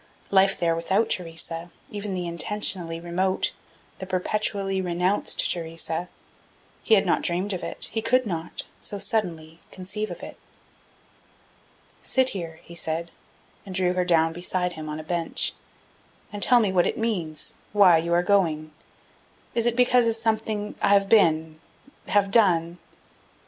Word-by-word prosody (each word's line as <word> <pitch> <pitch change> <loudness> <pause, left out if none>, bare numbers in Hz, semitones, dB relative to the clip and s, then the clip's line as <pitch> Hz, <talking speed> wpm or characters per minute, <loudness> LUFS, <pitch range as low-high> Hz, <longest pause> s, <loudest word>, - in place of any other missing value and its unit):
Life 195 0 +4
there 165 -1 +2
without 190 +7 0
Theresa, 165 -1 -2 0.2
even 205 -2 -4
the 180 -1 -3
intentionally 170 -1 -2
remote, 180 +3 0 0.5
the 190 - -6
perpetually 195 +1 -1
renounced 180 +2 +1
Theresa 165 0 -3 0.7
he 225 - +4
had 200 0 +3
not 175 - +2
dreamed 185 +4 -1
of 180 - -4
it, - - -3
he 225 - -2
could 255 +3 +2
not, 170 -4 -3 0.2
so 205 - -1
suddenly, 170 -6 -1
conceive 205 +3 -5
of - - -8
it. - - -9 1.6
"Sit 260 -1 +1
here," 165 -6 -6
he 170 - -12
said, 165 0 -2 0.5
and 190 -2 -8
drew 180 -1 +2
her 180 0 +1
down 165 -2 +2
beside 180 +1 -1
him 155 -2 -7
on 150 +1 -5
a - - -7
bench, 170 0 -1 0.8
"and 205 - -6
tell 245 +3 +6
me 210 -4 +1
what 180 -2 +3
it - - -2
means, 180 -9 -2
why 190 -5 +6
you 170 +1 -3
are 175 +1 +3
going. 165 -6 +1 0.8
Is 235 0 +1
it 235 - +1
because 250 -1 +4
of 225 - +1
something 220 -2 -1
that - - -15
I 200 - +4
have 200 -1 +3
been 160 -7 +3 0.5
have 200 0 +2
done?" 175 -6 +3
180 Hz, 155 wpm, -25 LUFS, 165-205 Hz, 1.6 s, tell